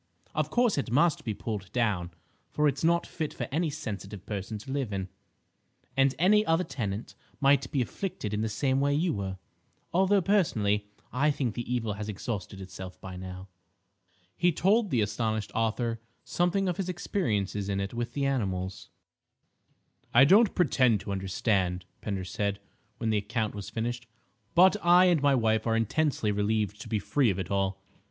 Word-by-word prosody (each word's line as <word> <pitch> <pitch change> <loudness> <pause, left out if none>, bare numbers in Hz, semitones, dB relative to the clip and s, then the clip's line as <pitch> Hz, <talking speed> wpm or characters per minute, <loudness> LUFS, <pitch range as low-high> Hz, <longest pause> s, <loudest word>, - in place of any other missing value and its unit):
Of - - 0
course 240 -9 +2
it 135 - -3
must 150 +6 +3
be 110 -3 -3
pulled 100 -3 -5
down, 105 -8 0 0.4
for 150 0 +2
it's 140 0 -1
not 170 +1 +3
fit 155 -3 -4
for - - -3
any 160 +3 +1
sensitive 105 - -6
person 105 +1 -4
to 135 +6 -9
live 135 -5 -2
in, 95 -1 -3 0.9
and 135 0 +3
any 210 +6 +5
other 165 -1 +2
tenant 105 - -4 0.3
might 140 -2 +3
be 135 -3 +2
afflicted 120 - -5
in 105 - 0
the 110 - 0
same 130 +5 +1
way 140 +1 +2
you 165 +3 +1
were. 95 -2 -4 0.6
Although, 190 +2 +3
personally, 105 - +2 0.3
I 140 +5 +3
think 135 -6 -1
the 120 +1 -5
evil 115 -4 0
has 105 +1 -5
exhausted 100 -1 -5
itself 95 -1 -9
by 95 -1 -8
now." 95 +1 -8 0.9
He 175 - +3
told 205 +7 +2
the 120 -7 +2
astonished 110 0 -1
author 115 0 -1 0.2
something 180 +3 +1
of 180 - -1
his 185 -2 -2
experiences 105 - -1
in 100 0 0
it 100 +2 -3
with 120 0 -3
the 140 -1 -1
animals. 95 -8 -2 1.3
"I 135 +3 +9
don't 205 +8 +5
pretend 130 - +3
to - - -6
understand," 95 -1 0 0.2
Pender 95 -3 -3
said, 100 +2 -2 0.4
when 110 - -1
the 110 - +2
account 110 +1 -2
was 100 -1 -6
finished, 120 +1 -3 0.5
"but 185 +3 +7
I 175 +1 +7
and 175 -5 +3
my 140 -1 +4
wife 110 -2 +1
are 115 - +2
intensely 115 0 +1
relieved 105 0 0
to 110 - -9
be 110 - +1
free 125 +5 +2
of 95 - -1
it 95 -1 -4
all. 95 0 -1
115 Hz, 175 wpm, -28 LUFS, 100-150 Hz, 1.3 s, I